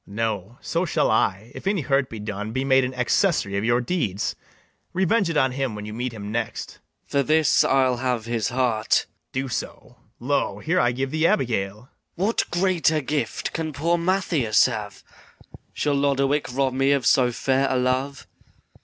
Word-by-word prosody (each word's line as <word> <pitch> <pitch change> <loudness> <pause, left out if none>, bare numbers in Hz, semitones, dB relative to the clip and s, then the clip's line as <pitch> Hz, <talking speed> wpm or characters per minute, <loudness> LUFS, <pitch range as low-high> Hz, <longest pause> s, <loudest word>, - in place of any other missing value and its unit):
BARABAS. 100 - -11
No; 110 0 -2
so 170 +2 -1
shall 165 - +1
I, 110 +1 0
if - - -8
any 195 -3 +1
hurt 135 -1 +1
be 115 - -7
done, 105 0 -5
Be 130 +3 -1
made 135 -1 +4
an 125 +1 -3
accessary 125 - +1
of 100 - -1
your 120 +2 +2
deeds: 120 - -2 0.6
Revenge 190 +1 +2
it 165 - -1
on 130 -3 +3
him 130 -3 -2
when 105 0 -6
you 105 - -7
meet 125 +2 -3
him 105 -2 -7
next. 115 -1 -4
MATHIAS. - - -35
For 140 - +3
this 155 +2 +3
I'll 130 -2 +2
have 125 -2 -1
his 115 -2 -1
heart. 120 -4 +1
BARABAS. - - -36 0.3
Do 130 +1 -2
so. 125 0 -6 0.2
Lo, 140 +4 0
here 175 +3 0
I 120 - +3
give 130 +2 -3
thee 155 +1 +2
Abigail! 105 -10 0
MATHIAS. 115 +5 -19 0.2
What 200 +6 0
greater 175 -4 +2
gift 145 +2 -2
can 160 -2 -3
poor 170 +5 +1
Mathias 170 - +2
have? 105 -5 -4 0.7
Shall 145 - -1
Lodowick 140 0 +1
rob 135 0 0
me 135 +2 +3
of 135 -4 0
so 125 0 +4
fair 135 +3 +1
a 130 - +1
love? 130 +2 -1
130 Hz, 190 wpm, -24 LUFS, 115-150 Hz, 0.7 s, made